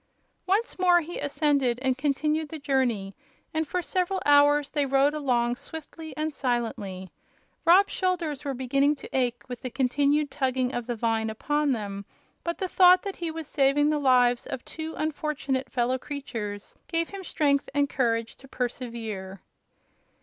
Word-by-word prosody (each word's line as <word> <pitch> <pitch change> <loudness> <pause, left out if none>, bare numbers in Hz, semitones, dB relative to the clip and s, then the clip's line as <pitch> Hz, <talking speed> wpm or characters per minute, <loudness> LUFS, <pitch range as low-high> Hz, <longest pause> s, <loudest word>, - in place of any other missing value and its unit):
Once 405 +3 0
more 355 -1 +5
he 340 +2 -6
ascended 280 -4 +1
and 260 -1 +2
continued 300 +3 0
the 320 - -6
journey, 250 -9 0 0.4
and 315 0 -1
for 360 +3 -2
several 370 +2 0
hours 290 0 +5
they 295 -2 +1
rode 275 +1 +3
along 245 -5 +1
swiftly 315 +3 -9
and 310 0 -2
silently. 215 -8 -3 0.5
Rob's 370 +4 +6
shoulders 340 -7 -1
were 275 -2 -3
beginning 275 +3 +2
to 280 - -10
ache 245 -2 0
with 245 -2 -7
the 255 - -4
continued 280 +3 +1
tugging 260 -2 0
of 240 -1 -3
the 240 - -2
vine 225 -1 0
upon 295 +6 0
them, 200 -4 -3 0.4
but 340 0 -2
the 375 - -2
thought 365 0 +6
that 395 -2 -5
he 340 -1 -3
was 320 0 -5
saving 290 +1 +3
the 300 - +1
lives 250 -3 +3
of 245 - -6
two 320 0 -6
unfortunate 295 -4 -2
fellow 255 +1 0
creatures 225 -8 -6
gave 330 0 -1
him 395 -1 -7
strength 285 -5 +1
and 285 0 +3
courage 230 -4 0
to 270 - -15
persevere. 230 -7 -4
280 Hz, 160 wpm, -27 LUFS, 245-310 Hz, 0.5 s, Rob's